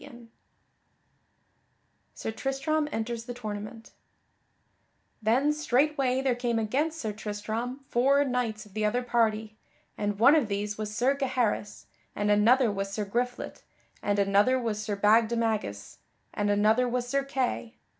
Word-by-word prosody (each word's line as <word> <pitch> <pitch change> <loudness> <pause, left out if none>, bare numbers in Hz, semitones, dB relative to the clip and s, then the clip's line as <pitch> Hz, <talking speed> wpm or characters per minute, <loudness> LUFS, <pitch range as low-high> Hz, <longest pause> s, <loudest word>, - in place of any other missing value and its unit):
[Sidenote: 240 -4 -13 1.9
Sir - - -4
Tristram 275 +5 -1
enters 230 +1 -3
the 245 - -6
tournament] 215 0 -7 1.3
Then 255 +7 +2
straightway 275 -2 +1
there 265 -2 +2
came 240 -1 -1
against 280 +9 0
Sir 215 -6 -3
Tristram 215 +5 -4
four 275 +4 +3
knights 245 -5 -2
of 205 - -18
the 215 +1 -2
other 245 +4 +1
party, 220 -3 0 0.4
and 205 -1 -1
one 245 +7 +7
of 290 -8 +2
these 205 0 -2
was 215 0 -4
Sir 255 +4 +3
Gaheris, 250 -6 -1 0.3
and 210 0 +1
another 230 +3 +4
was 195 0 -3
Sir 210 +1 -2
Griflet 245 +5 -3 0.4
and 205 0 0
another 200 +5 +3
was 220 -3 -2
Sir 215 -1 -2
Bagdemagus 220 - +1 0.3
and 205 0 -1
another 215 +5 +3
was 245 0 -2
Sir 275 +2 0
Kay. 260 -3 -2
230 Hz, 135 wpm, -28 LUFS, 210-255 Hz, 1.9 s, one